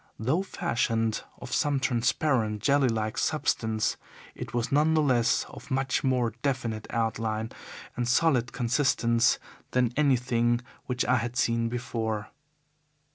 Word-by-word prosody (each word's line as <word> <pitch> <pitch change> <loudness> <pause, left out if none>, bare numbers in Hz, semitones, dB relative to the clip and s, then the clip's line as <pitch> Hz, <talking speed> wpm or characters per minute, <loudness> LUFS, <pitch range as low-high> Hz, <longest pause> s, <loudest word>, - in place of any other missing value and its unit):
Though 130 - +1
fashioned 115 - -1 0.2
of 125 0 -7
some 145 -2 +1
transparent, 120 -3 +1
jelly 140 +1 +4
like 110 -2 -1
substance, 110 -8 0 0.4
it - - -7
was 120 0 -2
none 155 +3 +3
the 155 - +4
less 125 -4 +2
of - - -12
much 135 -1 0
more 125 -3 +1
definite 120 -6 -2
outline 110 -1 -1 0.4
and 120 -1 -1
solid 125 -2 +2
consistence 120 -2 +2 0.4
than 125 -2 +2
anything 120 -4 +2 0.3
which 125 0 0
I 125 +1 +3
had 120 +1 -3
seen 115 -1 +1
before. 110 -3 -3
120 Hz, 130 wpm, -28 LUFS, 115-130 Hz, 0.4 s, jelly